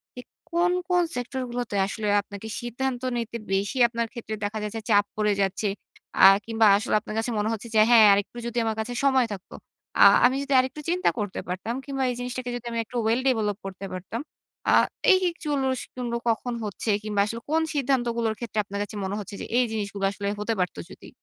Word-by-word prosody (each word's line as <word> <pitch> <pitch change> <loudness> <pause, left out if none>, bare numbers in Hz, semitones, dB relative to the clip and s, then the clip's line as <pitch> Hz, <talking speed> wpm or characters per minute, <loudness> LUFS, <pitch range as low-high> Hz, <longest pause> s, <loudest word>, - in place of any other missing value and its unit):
যে 250 - -7 0.3
কোন, 345 +1 +2 0.2
কোন 355 -1 +4
সেক্টরগুলোতে 245 -2 -4
আসলে 215 +1 -4
আপনাকে 200 +1 -9
সিদ্ধান্ত 245 +1 -3 0.2
নিতে 235 0 -3 0.2
বেশি 200 +7 0
আপনার 235 0 -2
ক্ষেত্রে 230 -2 -5
দেখা 205 +2 -3
যায় 210 - -3
যে 225 - -3
চাপ 205 -1 +5
পড়ে 210 -1 +2
যাচ্ছে। 195 +2 0 0.6
আ - - +12 0.2
কিংবা, 225 -1 +2
আসলে 215 - -1
আপনার 215 - -7
কাছে 230 +2 -2
মনে 215 +1 0
হচ্ছে 225 +2 -6
যে, - - +6
হ্যাঁ, 225 -3 +8
আরেকটু 205 +4 -1
যদি 235 0 -5
আমার 220 - -1
কাছে 240 +3 -3
সময় 265 -2 +4
থাকত। 190 - -10 0.5
আ - - +10 0.2
আমি 255 +1 +4
যদি 280 0 -2
আরেকটু 260 +4 -2
চিন্তা 360 +2 +2
করতে 205 -2 -3
পারতাম 190 +6 -3
কিংবা 270 -1 -2
এই - - -4
জিনিসটাকে 245 0 -4
যদি 240 - -12
আমি 230 - -2
একটু 245 - -6
well 230 +3 +2
develop 210 -5 0
করতে 195 0 -6
পারতাম। 190 +7 -5 0.5
আ - - +5 0.4
এই 375 - +7
এই 345 - -1
জিনিসগুলো 260 -4 -2
কখন 240 +2 -1
হচ্ছে 210 +2 -4
কিংবা, 210 -2 0
আসলে 230 +2 -5
কোন 320 +1 +3
সিদ্ধান্তগুলোর 240 -5 0
ক্ষেত্রে 225 -3 -3
আপনার 200 0 -5
কাছে 205 - -9
মনে 195 +2 -3
হচ্ছে 200 0 -7
যে - - -4
এই 250 - +4
জিনিসগুলো 200 -2 -3
আসলে 200 0 -5
হতে 220 +2 -1
পারত 180 - -1
যদি? - - -12
230 Hz, 200 wpm, -25 LUFS, 210-250 Hz, 0.6 s, আ